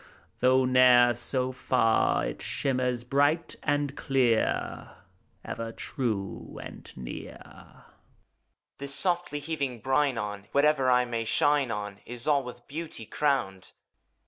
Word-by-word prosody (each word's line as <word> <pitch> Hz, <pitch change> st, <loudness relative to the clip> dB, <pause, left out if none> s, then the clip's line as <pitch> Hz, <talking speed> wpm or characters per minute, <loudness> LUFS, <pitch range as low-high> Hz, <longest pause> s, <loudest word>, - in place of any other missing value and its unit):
Though 130 Hz, +1 st, +4 dB
ne'er 125 Hz, -1 st, +6 dB
so 130 Hz, +1 st, 0 dB
far, 125 Hz, -3 st, +2 dB
It -, -, -5 dB
shimmers 125 Hz, -2 st, -1 dB
bright 145 Hz, +6 st, +1 dB
and 145 Hz, -1 st, 0 dB
clear, 125 Hz, -5 st, 0 dB, 0.6 s
Ever 115 Hz, 0 st, -5 dB
true 110 Hz, -7 st, -4 dB
and -, -, -10 dB
near. -, -, -7 dB
HOMUNCULUS. -, -, -17 dB, 1.0 s
This 140 Hz, 0 st, -3 dB
softly 175 Hz, -5 st, 0 dB
heaving 145 Hz, -5 st, -3 dB
brine 135 Hz, +2 st, +1 dB
on. 105 Hz, -2 st, -5 dB
Whatever 140 Hz, -2 st, +3 dB
I 125 Hz, 0 st, +4 dB
may 115 Hz, -1 st, -2 dB
shine 145 Hz, +3 st, +2 dB
on 105 Hz, -2 st, -5 dB
Is 120 Hz, +2 st, -7 dB
all 145 Hz, -2 st, +3 dB
with 125 Hz, -1 st, -10 dB
beauty 155 Hz, -5 st, -6 dB
crowned. 110 Hz, -7 st, -1 dB
130 Hz, 120 wpm, -28 LUFS, 115-140 Hz, 1.0 s, ne'er